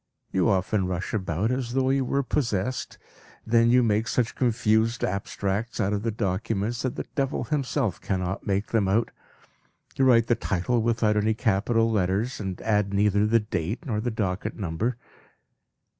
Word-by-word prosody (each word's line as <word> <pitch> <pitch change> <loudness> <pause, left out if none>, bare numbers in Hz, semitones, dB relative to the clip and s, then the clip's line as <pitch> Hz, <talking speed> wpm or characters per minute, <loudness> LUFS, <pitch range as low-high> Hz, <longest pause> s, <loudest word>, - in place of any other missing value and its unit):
You 95 +2 +2
often 95 0 +1
rush 90 0 -3
about 95 +1 -1
as 125 -2 -2
though 130 0 +2
you 135 0 +2
were 140 +2 0
possessed. 125 -3 -2 0.5
Then 115 +1 +4
you 125 +1 +5
make 110 0 +1
such 120 -2 0
confused 115 -1 +1
abstracts 100 +3 -2
of 100 +1 0
the 115 - -1
documents 110 +2 -2
that 130 -2 -2
the - - -4
devil 135 -1 -1
himself 135 - -1
cannot 95 0 -3
make 100 +1 0
them 110 -4 +2
out; 110 +5 +1 0.8
you 135 - +1
write 120 -3 +5
the 120 - +2
title 115 +2 0
without 110 -2 +1
any 110 +1 +2
capital 115 0 +1
letters, 105 +4 0
and 95 -3 -4
add 105 -2 +1
neither 100 +1 +3
the 115 +1 +4
date 105 - -3
nor 110 -6 -1
the 120 - -1
docket 105 -1 -3
number." 105 +6 -2
110 Hz, 160 wpm, -26 LUFS, 100-120 Hz, 0.8 s, you